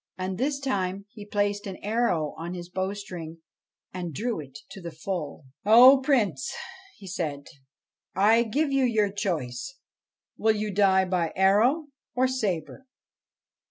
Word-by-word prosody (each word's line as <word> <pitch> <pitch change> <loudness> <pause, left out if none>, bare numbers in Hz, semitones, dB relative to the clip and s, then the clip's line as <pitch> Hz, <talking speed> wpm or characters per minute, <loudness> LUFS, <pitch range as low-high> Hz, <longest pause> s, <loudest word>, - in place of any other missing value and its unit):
And 185 +1 -4
this 275 +2 0
time 200 -7 -2
he 210 -2 -11
placed 205 0 -1
an 190 - -6
arrow 205 -9 0
on 170 +2 -6
his 175 -1 -8
bowstring 185 -3 -5 0.6
and 175 -4 -5
drew 235 - -2
it 140 -2 -9
to 195 -1 -9
the 170 - -6
full. 160 -2 -5
' - - -68
O 250 +6 +8
Prince,' 210 - +1 0.5
he 200 - -13
said, 160 -7 -4 0.4
' - - -52 0.2
I 230 +1 +5
give 275 +6 0
you 275 -1 +2
your 220 -5 +2
choice: 180 - -3 0.6
will 220 0 +2
you 210 -1 -3
die 190 -1 +4
by 180 -3 0
arrow 225 - +3 0.3
or 255 +1 +3
sabre 220 - -3
200 Hz, 150 wpm, -26 LUFS, 175-230 Hz, 0.6 s, O